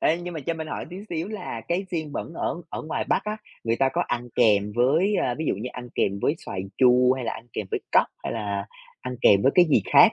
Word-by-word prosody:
Ê, 160 - +3
nhưng 175 -1 -6
mà 155 - -4
cho 165 +4 -2
mình 160 -1 -5
hỏi - - -5
tí 180 - -7
xíu 170 +3 -3
là 205 - -5
cái 180 +3 0
xiên 160 -4 -3
bẩn - - -5
ở - - -2
ở - - -5
ngoài 155 - -2
Bắc - - +1
á, 210 0 -2 0.3
người 115 +1 +1
ta 135 - +3
có - - +1
ăn 120 0 -2
kèm 105 -3 +3
với, 160 +12 +3
ơ, 125 - +1
ví 160 - -2
dụ - - +2
như 110 +6 -5
ăn 125 0 -8
kèm 100 0 +1
với 145 - +2
xoài 95 - -3 0.2
chua 125 0 +6
hay 130 -1 -4
là 115 - -1
ăn 110 +2 -9
kèm 105 - -3
với - - -1
cóc - - +5 0.2
hay - - -2
là 100 -3 -3 0.3
ăn 125 0 -5
kèm 100 0 +6
với 135 - +4
cái 180 - +7
gì 145 - +3
khác - - +8
130 Hz, 275 wpm, -25 LUFS, 115-165 Hz, 0.3 s, khác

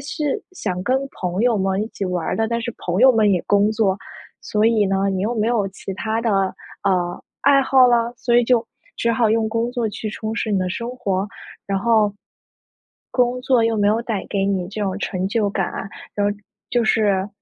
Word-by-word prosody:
是 295 0 -2
想 185 - -3
跟 255 +6 +2
朋 180 +2 -2
友 240 -2 +3
们 190 0 0
一 - - -3
起 200 - -5
玩 180 -3 -2
儿 - - 0
的， 225 0 0
但 235 0 -1
是 235 0 -4
朋 180 +3 -2
友 260 +1 +8
们 215 -3 +3
也 180 - +2
工 205 +1 +3
作。 210 -4 +1 0.5
所 210 0 0
以 225 -2 +3
呢 195 0 +1
你 190 -1 -1
又 220 +5 -1
没 215 -1 0
有 220 -5 +1
其 195 0 -7
他 220 +3 -2
的， 230 - +1 0.5
呃， 180 -3 0 0.2
爱 280 -1 +6
好 265 -1 +5
了？ 240 -1 +2
所 240 0 +1
以 - - +4
就 235 -1 +2 0.3
只 235 - +1
好 230 0 +2
用 225 0 +2
工 230 +2 -1
作 240 -2 -1
去 215 +1 -5
充 215 +1 -4
实 225 -1 -2
你 200 - +2
的 185 -1 -1
生 235 +5 -4
活。 200 -4 -1 0.4
然 195 -1 0
后， 215 -1 +2 1.0
工 250 0 +1
作 255 -2 +3
又 225 0 +1
没 205 -1 +2
有 220 +2 +2
带 225 -4 -3
给 195 -1 0
你 190 -3 0
这 210 +2 -6
种 195 -1 -1
成 190 -2 -2
就 210 -1 +1
感 195 -2 -1
啊 - - -5 0.3
然 205 0 +1
后 205 - +1 0.4
就 240 - +2
是 205 -3 +2
215 Hz, 235 characters per minute, -21 LUFS, 195-235 Hz, 1.0 s, 友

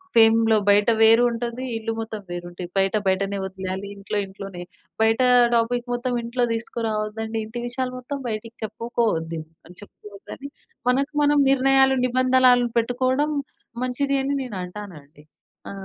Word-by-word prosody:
ఫేమ్‌లో 225 -1 +5
బయట 205 +2 +5
వేరుంటది 235 +2 +3
ఇల్లు 225 0 -3
మొత్తం 220 -2 -6
వేరుంటది. 175 0 -7
బయట 195 +1 +2
బయటనే 195 +1 0
ఒదిలేయాలి, 190 +1 -5
ఇంట్లో 200 +1 -3
ఇంట్లోనే. 190 -2 -9 0.4
బయట 225 +2 +3 0.4
టాపిక్ 240 +1 0
మొత్తం 245 +1 -2
ఇంట్లో 240 +1 0
తీసుకురావద్దండి. 220 -1 -3
ఇంటి 240 +2 -6
విషయాలు 255 +1 -3
మొత్తం 280 +3 -5
బయటికి 225 +2 -6
చెప్పుకోవద్దు 210 -8 -2 0.2
అని 180 +2 -15
చెప్పుకోవద్దని 210 +7 -11 0.4
మనకు 275 +4 +1
మనం 290 0 +3
నిర్ణయాలు 270 0 +4
నిబంధనలు 255 -1 +4
పెట్టుకోవడం 255 +5 +1 0.5
మంచిది 275 +2 -1
అని 280 +1 -1
నేను 235 -6 -7
అంటానండి. 175 -7 -10 0.5
ఆ! - - -6
230 Hz, 125 wpm, -23 LUFS, 200-250 Hz, 0.5 s, ఫేమ్‌లో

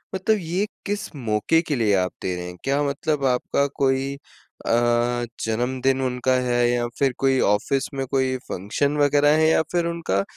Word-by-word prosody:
मतलब 215 +3 +1
ये 180 +5 -1 0.2
किस 205 -2 -4
मौके 115 +6 +1
के 150 - 0
लिए 110 -5 +2
आप 90 -1 0
दे 90 - -2
रहे 90 0 -5
हैं? 90 0 -9
क्या 140 +2 +1
मतलब 145 0 -1
आपका 130 +2 +1
कोई 135 0 0 0.5
अ, - - +1 0.7
जन्मदिन 130 +4 0
उनका 130 0 0
है 120 0 +2
या 120 0 0
फिर 135 -2 +2
कोई 135 -1 +2
ऑफिस 115 +6 +1
में 135 -1 -2
कोई 130 -1 +1
फंक्शन 140 +10 -1
वगैरह 145 0 +4
है? 160 - +4
या 160 - +4
फिर 175 -1 +1
उनका 165 - -1
135 Hz, 175 wpm, -23 LUFS, 120-145 Hz, 0.7 s, वगैरह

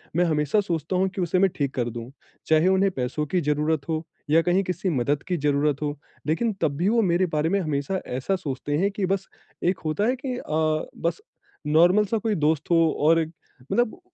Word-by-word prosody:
मैं 175 +1 +3
हमेशा 150 +3 +1
सोचता 170 -2 -2
हूँ 190 +1 +2
कि 190 - -2
उसे 180 +1 +1
मैं 195 +1 +4
ठीक 140 -2 -1
कर 120 -2 -1
दूँ, 120 +1 -7 0.4
चाहे 160 +2 +4
उन्हें 190 +1 +3
पैसों 135 +1 -2
की 180 - +3
ज़रुरत 150 0 0
हो 160 0 -1 0.3
या 160 +2 +5
कहीं 180 +3 +2
किसी 185 +1 -2
मदद 145 -1 0
की 180 -1 0
ज़रूरत 145 -1 +1
हो, 145 0 -2 0.3
लेकिन 220 +10 +1
तब 150 -4 +1
भी 180 +5 +2
वो 230 +1 +3
मेरे 185 -2 +2
बारे 150 +2 +1
में 200 +2 +2
हमेशा 155 +2 -1
ऐसा 130 +10 -1
सोचते 145 -4 -3
हैं 195 +5 +1
कि 200 -1 -2
बस 195 +1 -1 0.4
एक 180 +1 +1
होता 155 +7 0
है 250 - +2
कि 255 -2 -2
अ, 155 -5 -1
बस 170 - -2 0.5
नॉर्मल 175 +7 +5
सा 225 +3 -1
कोई 220 -1 -1
दोस्त 155 -1 0
हो 170 - +5 0.2
और 165 +2 +5 0.5
मतलब 240 -2 +1
165 Hz, 210 wpm, -25 LUFS, 150-190 Hz, 0.5 s, या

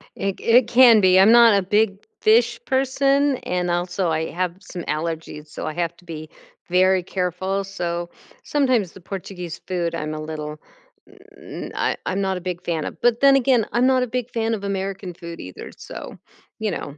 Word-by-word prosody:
It 195 -1 -3
c - - -11
it 235 +1 +5
can 240 -3 +7
be. 185 -1 +5
I'm 195 +4 +7
not 235 -3 +7
a - - +2
big 205 +1 +1 0.2
fish 235 +2 +3
person, 275 +1 +2
and 180 -4 -2
also 175 +1 -1
I 160 0 -1
have 180 -1 -2
some 180 -3 -8
allergies, 155 0 -4
so - - -6
I 155 - -3
have 170 +1 -2
to 175 - -21
be 155 -2 -8 0.4
very 185 +1 +3
careful. 185 +2 -2
So 175 -3 -4 0.3
sometimes 255 - +1
the 190 - -14
Portuguese 180 -2 -7
food, 175 -2 -2
I'm 155 -1 -4
a 155 - -5
little 150 -1 -6 0.8
mm, - - -8
I - - 0
I'm 195 +2 -1
not 190 -1 -1
a - - -7
big 180 -1 -5
fan 160 -3 -2
of, - - -8
but 240 -1 +3
then 275 0 +7
again, 250 -4 +3
I'm 245 +2 +3
not 260 -1 +3
a - - -2
big 250 0 -3
fan 225 0 -1
of 205 -3 -4
American 195 -1 -4
food 170 -1 -9
either, 90 0 -9
so - - -9 0.4
you 215 -1 -1
know. 145 -4 -6
190 Hz, 195 wpm, -22 LUFS, 170-230 Hz, 0.8 s, can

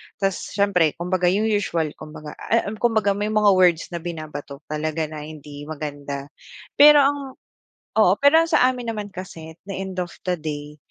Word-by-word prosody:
Ta's 195 -1 -1 0.2
siyempre 185 -6 +2
kumbaga 180 +1 0
yung 195 +4 +2
usual 195 -8 0
kumbaga, 155 -1 -9
ah, 225 -2 0
um, 215 - -8
kumbaga 220 -4 +2
may 205 +1 -1
mga 215 -1 +4
words 180 -3 +3
na 170 - -4
binabato 155 -4 -7
talaga 155 +1 -2
na 150 -1 -7
hindi 145 -1 -10
maganda. 145 -2 -6 0.5
Pero 295 0 +9
ang 285 +1 +2 0.8
oo 200 -4 +6
pero 285 +3 +6
ang 330 - -8
sa 300 -6 +5
amin 245 -2 -4
naman 210 -1 -5
kasi, 165 -3 -8
at - - -51
the 195 - -4
end 190 -1 -5
of 175 - -5 0.2
the 180 - +2
day, 150 -1 -6
180 Hz, 180 wpm, -22 LUFS, 155-210 Hz, 0.8 s, Pero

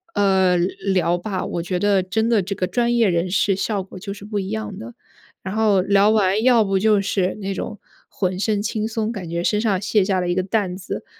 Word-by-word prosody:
呃， 190 -3 +3
聊 180 0 0
吧， 185 +1 -4
我 170 - -3
觉 180 +1 -2
得 200 -1 +2
真 220 +4 -1
的 230 -3 +3
这 195 +2 -4
个 185 - -1
专 235 +5 0
业 235 -3 +3
人 175 0 0
士 195 +1 +2
效 200 +1 -1
果 190 - -12
就 200 +2 -6
是 200 0 -11
不 210 0 -4
一 190 -1 -4
样 110 -1 -4
的。 115 +1 -9 0.5
然 190 +2 -5
后 215 -3 +3
聊 200 +2 +3
完 210 -1 +2
要 240 -3 +5
不 195 -1 +1
就 210 +1 +3
是 190 -2 -1
那 195 -1 -3
种 210 +2 -6 0.3
浑 185 -2 -2
身 205 0 0
轻 215 0 -2
松， 225 0 -2
感 185 -6 -7
觉 170 +1 -2
身 210 +3 +1
上 200 -5 0
卸 205 0 +2
下 190 -1 0
了 180 - -2
一 175 - 0
个 185 - +1
担 195 -2 -1
子， 185 0 -6
195 Hz, 250 characters per minute, -21 LUFS, 185-215 Hz, 0.5 s, 要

